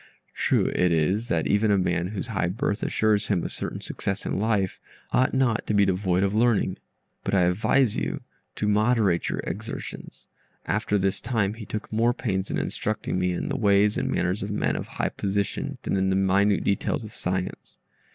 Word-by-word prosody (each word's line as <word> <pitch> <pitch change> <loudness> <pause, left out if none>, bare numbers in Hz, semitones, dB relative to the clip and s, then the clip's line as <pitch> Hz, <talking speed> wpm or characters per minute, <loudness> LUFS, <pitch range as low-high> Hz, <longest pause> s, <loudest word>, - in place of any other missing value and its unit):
True - - +2
it 90 -1 +2
is, 90 +8 +1
that 80 -8 0
even 105 +2 +2
a 100 - +4
man 90 -2 0
whose 100 0 -4
high 95 -5 0
birth 105 +3 -1
assures 105 -1 +1
him 95 -5 +1
a - - -3
certain - - -5
success 95 - -4
in - - -1
life, 105 -3 0 0.3
ought 130 - +3
not 130 -4 +1
to 105 - +1
be 100 -1 +5
devoid 95 -1 +1
of 100 0 +1
learning, 110 -4 +2 0.5
but 100 - 0
I 95 - +4
advise 105 +7 +2
you - - -2 0.3
to 105 - -1
moderate 105 -4 +2
your - - -2
exertions. 110 +5 -7 0.4
After 105 0 0
this 95 0 0
time, 115 -5 0
he 110 -2 -9
took 110 0 -5
more 115 +2 +2
pains 95 -4 -2
in - - -1
instructing 110 -3 -2
me 90 0 +1
in 90 - -3
the 140 - -2
ways 105 -2 +3
and 130 +1 -1
manners 90 -4 0
of 100 - -3
men 105 - 0
of - - -4
high - - -2
position 100 0 -2
than - - -1
in 95 0 +1
the 95 - +2
minute 95 +1 +3
details 100 +3 0
of 110 - -9
science. 95 0 -4
100 Hz, 195 wpm, -25 LUFS, 95-110 Hz, 0.5 s, be